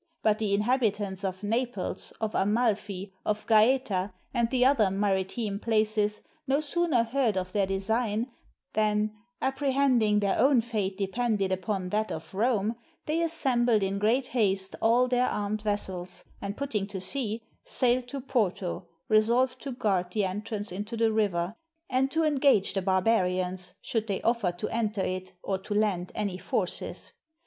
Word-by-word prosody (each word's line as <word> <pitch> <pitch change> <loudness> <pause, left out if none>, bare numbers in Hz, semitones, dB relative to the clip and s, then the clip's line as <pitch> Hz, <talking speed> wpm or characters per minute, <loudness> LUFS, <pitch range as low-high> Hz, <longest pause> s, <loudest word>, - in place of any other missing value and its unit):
But 215 0 +3
the 200 -2 +1
inhab 245 +6 +2
itants 200 -3 0
of 190 0 -3
Naples, 225 -3 -1
of 220 -1 -2
Amalfi, 205 -2 0
of 210 0 -1
Gaeta, 215 -4 +3 0.2
and 235 -2 +1
the 250 0 +3
other 255 -7 +4
mari 195 0 +1
time 200 0 -4
places, 215 -2 +1 0.2
no 275 +2 +3
sooner 310 -4 +1
heard 230 -3 0
of 185 0 -2
their 200 -1 +1
design, 220 +4 0 0.4
than, 215 0 +1 0.3
appre 270 +1 0
hending 245 -6 +3
their 200 -1 +1
own 265 +1 +5
fate 210 -5 -2
depended 205 0 0
upon 185 0 -2
that 215 +3 0
of 160 - -7
Rome, 220 +1 +1 0.3
they 315 +2 0
assembled 245 -9 +2
in 195 +1 -1
great 235 +6 +2
haste 195 -6 0
all 240 +3 +4
their 250 0 +2
armed 210 +1 -2
vessels, 190 -4 -3 0.2
and 200 +1 -4
putting 225 -8 -2
to 200 -2 -5
sea, 225 +2 -2 0.2
sailed 250 0 +1
to 275 +2 -5
Porto, 195 -8 -1 0.2
resolved 240 +4 +3
to 275 - -5
guard 190 -7 0
the 210 -3 +1
entrance 205 +2 -3
into 210 +5 -5
the 225 0 +3
river, 195 -4 0 0.4
and 260 +1 +2
to 320 +3 +1
engage 275 -10 +3
the 195 - 0
barbarians, 185 -2 +1
should 225 -4 -1
they 195 -2 -1
offer 230 -6 +2
to 175 +4 -4
enter 215 -3 -1
it, 185 0 -3
or 195 -1 -1
to 205 +2 -4
land 200 -4 +1
any 200 -3 -2
forces. - - -3
215 Hz, 160 wpm, -28 LUFS, 195-240 Hz, 0.4 s, own